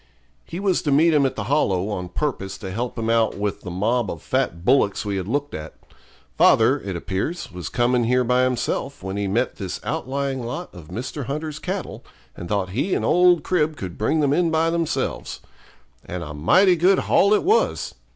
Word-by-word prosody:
He 170 - -6
was 195 -3 +1
to 145 - -1
meet 160 +4 +4
him 140 -3 +4
at - - -5
the 105 - -3
Hollow 105 -7 +1
on 90 -4 -4
purpose 95 -3 -3
to 95 -3 -7
help 120 +6 -4
him 115 -1 -2
out 115 -1 +2
with 105 0 -2
the 90 - -7
mob 105 +5 0
of 85 - -6
fat 85 +1 -1
bullocks 120 -5 +2
we 100 -1 -2
had 95 -1 -4
looked 145 +5 -2
at. 80 +1 -7 0.6
Father, - - +5
it - - -5
appears, 150 - -3
was 90 -5 -6
coming 120 0 +1
here 125 +2 +2
by 125 +1 +2
himself 130 0 -2
when 95 0 -4
he 100 -1 -1
met 95 - 0
this - - -5
outlying 135 -1 -2
lot 125 +10 -6
of 85 -5 -12
Mr. 130 - -5
Hunter's 150 +3 -4
cattle, - - -5 0.3
and 85 - -8
thought 100 -3 0
he 140 - 0
and - - -1
old 180 -2 +4
Crib 155 -4 0
could 90 -3 -7
bring 155 +9 +1
them 140 -1 +2
in 175 +1 +2
by 160 +1 +2
themselves. 170 -2 -2 0.6
And 90 -1 -6
a 75 -3 -7
mighty 180 - +4
good 185 +4 +4
haul 200 - +3
it - - 0
was. 430 +6 +1
125 Hz, 200 wpm, -22 LUFS, 100-155 Hz, 0.6 s, Father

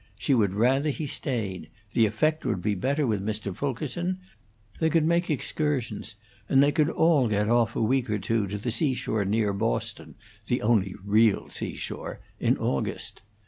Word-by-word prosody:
She 140 - +1
would 100 -6 +2
rather 135 +7 +3
he 150 +2 -3
stayed; 105 - -3 0.2
the 115 -3 +4
effect 155 +9 0
would 95 - -1
be 105 +4 0
better 140 +9 0
with 105 -5 0
Mr. 105 -2 -3
Fulkerson; 145 - -2 0.6
they 160 - +3
could 160 -1 +3
make 170 +2 +2
excursions, 140 -8 -2 0.3
and 135 0 +6
they 145 - +4
could 150 +1 +2
all 160 -6 +3
get 105 0 +1
off 120 -1 +2
a - - +1
week 125 +1 +1
or 105 - +1
two 105 +1 0
to 105 +2 -4
the 115 +4 -2
seashore 125 -6 0
near 105 0 +1
Boston - - -3 0.3
the - - 0
only 105 -4 +2
real 105 +1 +3
seashore - - -5 0.2
in - - +2
August. 65 - -3
115 Hz, 170 wpm, -27 LUFS, 105-145 Hz, 0.6 s, and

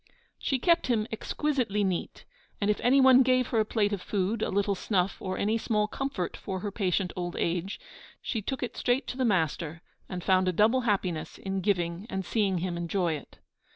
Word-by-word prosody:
She 270 - 0
kept 335 +5 +3
him 225 -4 +1
exquisitely 230 -3 -1
neat, 185 -3 -3 0.3
and 205 0 +2
if 210 - -2
anyone 260 0 +6
gave 255 -1 +3
her 230 - +1
a 215 - +3
plate 210 -1 +1
of 200 - -3
food, 205 +2 -1
a - - 0
little 200 +1 +1
snuff, 190 -1 0
or 185 -1 -3
any 220 +3 +1
small 210 -1 +1
comfort 270 -8 -3
for 190 -2 -5
her 205 - -3
patient 190 -2 0
old 175 -1 -4
age, 175 +3 -1 0.4
she 225 - -3
took 260 +5 -3
it 240 -1 -4
straight 245 +3 +1
to 250 - -5
the 260 - +1
'master,' 165 -4 0 0.3
and 180 -2 -5
found 185 0 +3
a - - +3
double 225 +8 +4
happiness 175 -6 -1
in 195 0 -3
giving 175 0 -1
and 190 -1 -3
seeing 200 -4 +1
him 175 0 -2
enjoy 170 0 0
it. 150 - -8
200 Hz, 195 wpm, -28 LUFS, 180-230 Hz, 0.4 s, anyone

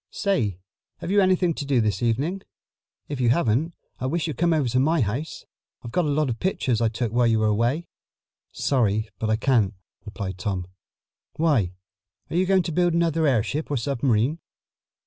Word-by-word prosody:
Say, 120 - 0 0.4
have 180 - -5
you 205 0 +5
anything 185 -2 +3
to 150 - -5
do 140 -3 +1
this 105 -1 0
evening? 140 - 0 0.7
If 140 -3 -4
you 120 - +3
haven't, 140 +4 +1 0.2
I 130 - -2
wish 165 +3 -1
you'd 155 -4 -3
come 170 0 +3
over 155 -5 +2
to 125 - +1
my 155 +3 +2
house. 120 +9 -3 0.4
I've 120 - -7
got 180 +4 +1
a - - 0
lot 150 +1 +1
of 115 -2 -3
pictures 130 - 0
I 115 - +3
took 115 0 -3
while 120 0 +3
you 115 -1 +3
were 110 - +1
away." 120 +10 +1 0.7
"Sorry, 110 -5 0
but 110 - -1
I 110 - +3
can't," 110 -4 +2 0.3
replied 95 -3 -6
Tom. 90 -2 -2 0.7
"Why, 135 - +1 0.6
are - - -3
you 185 +1 +2
going 190 -1 +4
to 170 - -3
build 175 +1 +2
another 165 -2 +2
airship 135 +4 0
or 145 - 0
submarine?" 130 +2 0
130 Hz, 185 wpm, -24 LUFS, 110-165 Hz, 0.7 s, you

